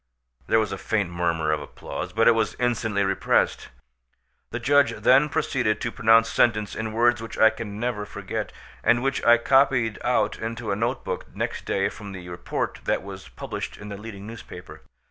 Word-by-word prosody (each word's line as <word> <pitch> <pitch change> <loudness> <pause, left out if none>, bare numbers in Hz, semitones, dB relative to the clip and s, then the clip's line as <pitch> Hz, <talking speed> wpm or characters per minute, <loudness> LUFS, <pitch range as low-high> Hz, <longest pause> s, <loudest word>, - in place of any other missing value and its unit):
There - - +3
was 110 - -1
a - - -4
faint 105 -5 -1
murmur 85 -3 0
of 75 -1 0
applause, - - -7
but 115 +1 +3
it - - +9
was 115 -1 0
instantly 115 -4 0
repressed. 95 -1 +1 0.8
The - - -4
judge 145 0 +3
then 135 +4 +4
proceeded 120 -7 0
to 120 - -3
pronounce 115 0 +4
sentence 105 -3 +1
in 110 0 -3
words 120 +1 +2
which 115 -1 -7
I 110 - +6
can 110 -2 -7
never 120 -3 -2
forget, - - -5 0.3
and 120 +1 +3
which 135 0 -1
I 120 0 +7
copied 130 -3 +3
out 110 -4 +1
into 115 -1 -4
a - - +1
note 120 +5 -2
book 90 - -4
next - - -3
day 100 0 +1
from 100 -2 -9
the 90 -2 -8
report 85 0 -3
that - - 0
was - - -9
published - - -6
in 105 - -9
the 100 - -5
leading 105 -2 -9
newspaper. 115 +1 -10
110 Hz, 185 wpm, -25 LUFS, 100-120 Hz, 0.8 s, it